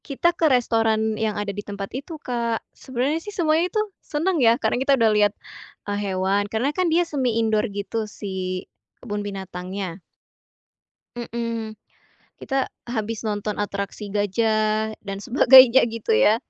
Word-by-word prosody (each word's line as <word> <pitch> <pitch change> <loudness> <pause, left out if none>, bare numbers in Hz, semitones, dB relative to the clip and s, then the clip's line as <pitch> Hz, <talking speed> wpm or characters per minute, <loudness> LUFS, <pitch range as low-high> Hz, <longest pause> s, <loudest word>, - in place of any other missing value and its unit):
Kita 340 +5 +1
ke 330 -2 +2
restoran 225 -3 +2
yang 215 -1 -2
ada 205 -1 -3
di 205 - -5
tempat 200 -1 -7
itu, 280 +6 -6
Kak. 235 -5 -2
Sebenernya 265 +5 -2
sih 415 - -8
semuanya 340 -2 +1
itu 430 - 0 0.2
seneng 325 +2 -1
ya, 230 -1 +5
karena 245 - 0
kita 275 0 +3
udah 225 -2 +4
lihat, 210 -1 +3 0.5
eee, 205 0 -2 0.2
hewan, 200 +2 +1
karena 245 +7 0
kan 365 0 +1
dia 345 +2 +3
semi-indoor 230 -7 0
gitu 205 +2 -4
si 185 -3 -4 0.3
kebun 205 -4 -4
binatangnya. 190 -2 -6 1.1
Mhm, 230 -2 -4 0.6
kita 270 -1 -2 0.2
habis 230 -2 -4
nonton 210 -1 -2
atraksi 200 0 -4
gajah 215 +1 +1
dan 195 -1 -6
sebagainya, 260 0 +8
gitu 230 -1 -2
ya. 110 - +5
220 Hz, 140 wpm, -23 LUFS, 205-260 Hz, 1.1 s, sebagainya